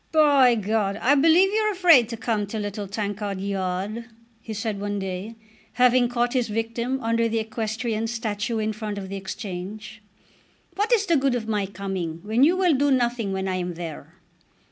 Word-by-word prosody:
"By 285 Hz, -6 st, +5 dB
G, 215 Hz, -1 st, -4 dB
I 215 Hz, +4 st, +2 dB
believe 330 Hz, +7 st, +5 dB
you're 430 Hz, 0 st, +2 dB
afraid 335 Hz, -, +5 dB
to 230 Hz, -, -5 dB
come 215 Hz, -3 st, -1 dB
to 220 Hz, -, -5 dB
Little 205 Hz, -1 st, -4 dB
Tankard 205 Hz, -1 st, -3 dB
Yard," 195 Hz, +3 st, -3 dB, 0.4 s
he 225 Hz, -, -8 dB
said 215 Hz, -1 st, -3 dB
one 205 Hz, 0 st, -2 dB
day, 195 Hz, +3 st, -5 dB, 0.4 s
having 250 Hz, -1 st, +4 dB
caught 240 Hz, 0 st, 0 dB
his 250 Hz, -3 st, +1 dB
victim 230 Hz, +4 st, -2 dB
under 230 Hz, 0 st, +1 dB
the 225 Hz, -, -1 dB
equestrian 220 Hz, 0 st, -2 dB
statue 225 Hz, -1 st, -2 dB
in 215 Hz, 0 st, -1 dB
front 210 Hz, -1 st, -5 dB
of 190 Hz, -1 st, -6 dB
the 195 Hz, -, -5 dB
Exchange. 205 Hz, +2 st, -7 dB, 0.7 s
"What 415 Hz, +4 st, -1 dB
is 440 Hz, -4 st, +4 dB
the 340 Hz, -5 st, +3 dB
good 270 Hz, -2 st, +1 dB
of 225 Hz, -2 st, -3 dB
my 210 Hz, -3 st, -1 dB
coming 190 Hz, -4 st, -4 dB
when 220 Hz, +5 st, +2 dB
you 340 Hz, +5 st, +4 dB
will 365 Hz, -3 st, +3 dB
do 285 Hz, +1 st, +2 dB
nothing 240 Hz, -5 st, +1 dB
when 190 Hz, 0 st, -2 dB
I 185 Hz, -1 st, -1 dB
am 175 Hz, -1 st, -3 dB
there?" 165 Hz, -1 st, -8 dB
220 Hz, 185 wpm, -24 LUFS, 200-245 Hz, 0.7 s, By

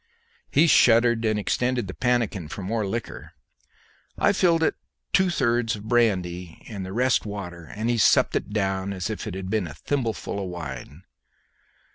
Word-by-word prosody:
He 155 Hz, -, +4 dB
shuddered, 120 Hz, -6 st, +5 dB
and 110 Hz, -1 st, +1 dB
extended 125 Hz, +3 st, 0 dB
the 95 Hz, -, -6 dB
pannikin 120 Hz, -9 st, 0 dB
for 95 Hz, +5 st, -7 dB
more 105 Hz, +2 st, -1 dB
liquor. 115 Hz, +3 st, -5 dB, 0.8 s
I 205 Hz, -, +3 dB
filled 170 Hz, -4 st, +3 dB
it -, -, +2 dB
with -, -, -50 dB
two 190 Hz, -1 st, +4 dB
thirds 120 Hz, -7 st, +1 dB
of 105 Hz, -, -10 dB
brandy 90 Hz, -8 st, 0 dB
and 100 Hz, -4 st, -6 dB
the 95 Hz, -, -6 dB
rest 125 Hz, +4 st, +2 dB
water, 90 Hz, -5 st, -7 dB
and 110 Hz, +8 st, -4 dB
he 120 Hz, -1 st, +1 dB
supped -, -, +4 dB
it -, -, -1 dB
down 95 Hz, -2 st, -1 dB
as 95 Hz, +2 st, -3 dB
if 110 Hz, -, -5 dB
it 100 Hz, -, -5 dB
had 95 Hz, 0 st, -5 dB
been 110 Hz, -5 st, 0 dB
a 75 Hz, -, -9 dB
thimbleful 115 Hz, -7 st, -2 dB
of 95 Hz, -, -5 dB
wine. 75 Hz, -1 st, -7 dB
105 Hz, 175 wpm, -25 LUFS, 95-120 Hz, 0.8 s, shuddered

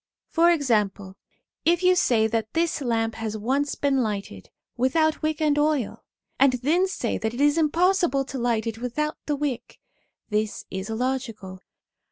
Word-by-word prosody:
For 340 Hz, +1 st, +4 dB
example, 210 Hz, -, 0 dB, 0.5 s
if 345 Hz, +2 st, +2 dB
you 365 Hz, 0 st, +5 dB
say 235 Hz, -10 st, +3 dB
that 220 Hz, 0 st, -2 dB
this 330 Hz, -2 st, 0 dB
lamp 225 Hz, -3 st, 0 dB
has 220 Hz, -1 st, -4 dB
once 270 Hz, +7 st, -1 dB
been 275 Hz, -2 st, +1 dB
lighted 200 Hz, -, -4 dB, 0.3 s
without 315 Hz, +6 st, +1 dB
wick 310 Hz, -1 st, -1 dB
and 300 Hz, -2 st, +2 dB
oil, 295 Hz, -6 st, 0 dB, 0.4 s
and 275 Hz, -1 st, +5 dB
then 305 Hz, +10 st, +1 dB
say 250 Hz, -11 st, -2 dB
that 220 Hz, +1 st, -2 dB
it -, -, -6 dB
is 290 Hz, +1 st, +4 dB
impossible 330 Hz, -3 st, +2 dB
to 265 Hz, 0 st, -6 dB
light 235 Hz, -2 st, 0 dB
it 225 Hz, -1 st, -4 dB
without 300 Hz, +6 st, -2 dB
the 295 Hz, -, +1 dB
wick, 275 Hz, -4 st, -4 dB, 0.5 s
this 210 Hz, 0 st, -1 dB
is 190 Hz, +2 st, -5 dB
illogical.' 225 Hz, -5 st, -3 dB
260 Hz, 160 wpm, -25 LUFS, 220-305 Hz, 0.5 s, you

